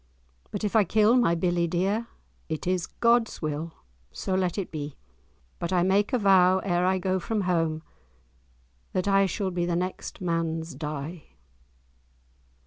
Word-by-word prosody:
But 205 - -5
if 210 +1 -1
I 220 - +6
kill 215 +5 +4
my 235 -9 +3
billie 175 0 +1
dear 195 +7 0 0.4
It 155 -1 -3
is 180 -1 0
God's 235 -1 +2
will, 155 +1 -3 0.4
so 190 - -4
let 185 -1 0
it 195 - -3
be; 145 -2 -5 0.6
But 170 - -3
I 180 -2 +3
make 195 +3 +2
a 250 - +3
vow, 190 -3 +5
ere 180 -2 +1
I 190 0 +2
go 185 0 0
from 215 +3 -2
home, 165 -4 0 1.1
That 185 +1 0
I 195 0 +4
shall 190 +1 -2
be 175 -1 -1
the 175 - 0
next 185 +2 -4
man's 165 -2 -2
die." 150 +3 -6
180 Hz, 155 wpm, -27 LUFS, 165-195 Hz, 1.1 s, I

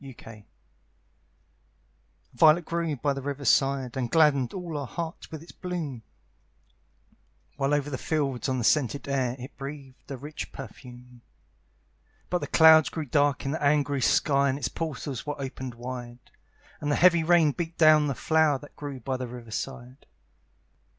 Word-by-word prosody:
A 115 -5 -12 1.9
VIOLET 155 +6 +5
grew 165 -2 -2
by 140 +2 0
the 135 - -5
river 140 +1 -5
side, 135 -3 +2
And 125 -3 -2
gladdened 140 -4 +3
all 170 -6 -5
hearts 165 +5 -6
with 160 -1 -8
its 170 - -13
bloom; 165 -9 -5 1.5
While 140 0 -1
over 145 0 -2
the 130 - -4
fields, 140 -5 -1
on 130 - 0
the 120 - -2
scented 140 +3 +1
air, 130 -3 0
It 130 +2 -10
breathed 135 -1 -9
a 135 - -5
rich 145 +4 -7
perfume. 125 -2 -12 1.1
But 180 - +1
the - - -5
clouds 160 -1 +7
grew 160 -2 -4
dark 145 0 +1
in 135 - -1
the 160 - -3
angry 145 -1 +2
sky, 140 +2 +3
And 135 - -1
its 125 -4 -2
portals 145 -5 -5
were 145 0 -4
opened 130 -2 -6
wide; 120 0 -8 0.5
And 145 0 -2
the - - +3
heavy 170 -2 +5
rain 165 -2 +4
beat 165 +2 -5
down 155 -2 +6
the 140 - -2
flower 155 -1 +2
That 145 +2 -15
grew 145 -3 -7
by 130 +2 -2
the 125 -1 -5
river 120 -2 -10
side. 130 +2 -6
140 Hz, 160 wpm, -27 LUFS, 130-155 Hz, 1.9 s, clouds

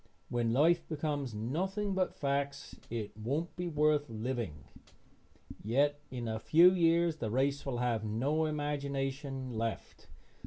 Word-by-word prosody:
When 120 -1 0
life 165 +7 +3
becomes 145 -6 -2
nothing 190 - -1
but 185 -1 0
facts 140 0 -2
it 110 -3 -4
won't 140 +11 -2
be 180 0 -3
worth 150 -2 +2
living; 110 - -4 1.0
yet 145 +7 +2
in 120 -2 -4
a 110 0 -2
few 170 +9 +7
years 170 -2 +3
the 115 - -3
race 140 +4 0
will 130 -3 -1
have 120 -3 0
no 135 +9 0
imagination 140 -3 -2
left. 115 0 -4
140 Hz, 130 wpm, -32 LUFS, 120-155 Hz, 1.0 s, few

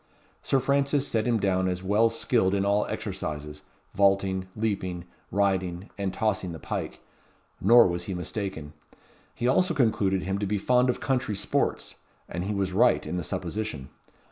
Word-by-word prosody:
Sir 135 - +2
Francis 140 +1 +1
set 110 0 0
him 115 -2 +2
down 95 -2 +1
as 90 0 -2
well 105 +4 +3
skilled 115 -4 +1
in 100 0 +1
all 100 +1 +2
exercises; 75 -8 -5 0.3
vaulting, 95 -1 +2
leaping, 95 -5 -2 0.2
riding, 95 -2 -1
and 100 -2 -2
tossing 95 -4 -1
the - - -6
pike; - - -5 0.6
nor 120 +4 +7
was 85 -1 -1
he 95 - -4
mistaken. 90 -4 -5 0.6
He 120 - -1
also 180 +9 +2
concluded 100 -7 +2
him 95 +1 -2
to 100 - -1
be 105 +2 0
fond 125 +5 +3
of 125 - 0
country 130 -5 0
sports; - - -1 0.3
and 90 +1 -4
he 105 +1 -2
was 95 -1 -1
right - - +3
in 90 - -3
the 90 - -2
supposition. 80 -5 -4
100 Hz, 165 wpm, -27 LUFS, 95-110 Hz, 0.6 s, nor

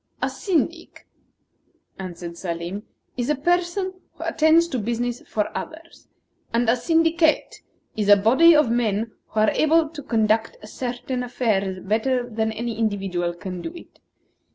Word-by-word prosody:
"A - - -1
syndic," 335 -2 -2 0.9
answered 175 -2 -7
Salim, 175 +3 -5 0.3
"is 245 +1 -1
a 300 - +3
person 350 +5 0 0.2
who - - -9
attends 320 +2 +4
to 260 - -2
business 240 +2 -2
for 210 -1 -2
others; 330 +1 -8 0.4
and 235 +1 +1
a 230 - +4
syndicate 325 +4 +2 0.3
is 210 -2 -1
a 205 - +9
body 265 +12 +6
of 300 -6 +4
men 225 -2 0 0.2
who 220 - -3
are 215 - +4
able 315 +1 +3
to 310 -2 -8
conduct 225 -4 +1
certain 250 +2 -4
affairs 200 -7 -1
better 240 +4 0
than 220 -1 -1
any 230 +1 -4
individual 190 -5 -1
can 180 0 -6
do 330 - -5
it. 345 - -14
235 Hz, 145 wpm, -23 LUFS, 210-310 Hz, 0.9 s, a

